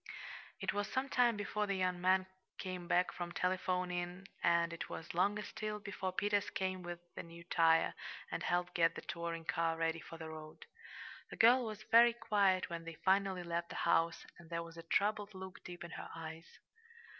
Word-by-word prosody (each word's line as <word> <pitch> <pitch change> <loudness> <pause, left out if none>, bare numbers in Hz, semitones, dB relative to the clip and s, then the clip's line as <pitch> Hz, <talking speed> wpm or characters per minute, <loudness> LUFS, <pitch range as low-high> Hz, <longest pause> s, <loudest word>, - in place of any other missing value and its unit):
It - - -1
was 205 0 -1
some 265 +1 0
time 240 -4 +4
before 210 0 -1
the 200 - 0
young 185 -1 0
man 185 +1 +4 0.3
came 180 -2 -5
back 180 +1 +3
from 175 -1 -4
telephoning, 180 0 -1
and 170 0 +3
it 170 - -5
was 165 - -6
longer 205 +4 +2
still 215 0 -4
before 200 -2 -3
Peters 205 +1 +1
came 185 -1 -2
with 175 -1 -5 0.2
the - - -5
new 170 0 -11
tire, 165 -1 +4 0.4
and - - -2
helped 175 0 0
get 165 -1 +3
the - - -5
touring 170 -1 -4
car 165 0 +1
ready 165 0 0
for 165 - -10
the 160 -1 -7
road. 155 -1 -9 0.6
The - - -8
girl 245 +3 +7
was 215 -1 -6
very 235 +1 +7
quiet 205 -5 +2
when 170 -1 -5
they 165 0 -7
finally 190 -1 +3
left 170 0 -2
the - - -7
house, 165 0 +2
and 170 -1 -14
there 170 -1 -2
was 165 0 -11
a 165 - -7
troubled 205 +4 +1
look 190 0 -8
deep 175 0 -8
in 170 - -8
her - - -7
eyes. 165 0 -7
180 Hz, 190 wpm, -36 LUFS, 170-200 Hz, 0.6 s, girl